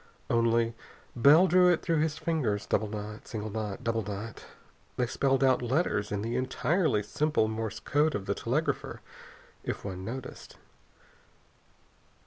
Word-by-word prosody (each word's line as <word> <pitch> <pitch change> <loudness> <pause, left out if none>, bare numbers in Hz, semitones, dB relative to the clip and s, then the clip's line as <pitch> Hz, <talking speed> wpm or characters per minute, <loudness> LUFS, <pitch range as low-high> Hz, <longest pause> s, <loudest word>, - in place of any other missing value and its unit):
Only, 115 0 +2 0.4
Bell 145 +9 +7
drew 180 0 +5
it 170 - 0
through 165 -3 +1
his 155 0 0
fingers. 135 -12 -1
Double 110 - 0
knot, 105 0 -7
single 110 -1 -5
knot, 110 +1 -4
double 115 -1 0
knot.... 105 +2 -6 0.5
They 125 - +2
spelled 135 +2 +1
out 130 -2 +4
letters 120 -4 0
in 105 0 -2
the 115 +2 -2
entirely 130 - +1
simple 150 +1 +1
Morse 110 -1 -4
code 150 +2 +1
of 100 - -3
the - - 0
telegrapher, - - -2 0.6
if - - -4
one 95 -2 -5
noticed. 125 +6 -7
115 Hz, 140 wpm, -29 LUFS, 105-150 Hz, 0.6 s, Bell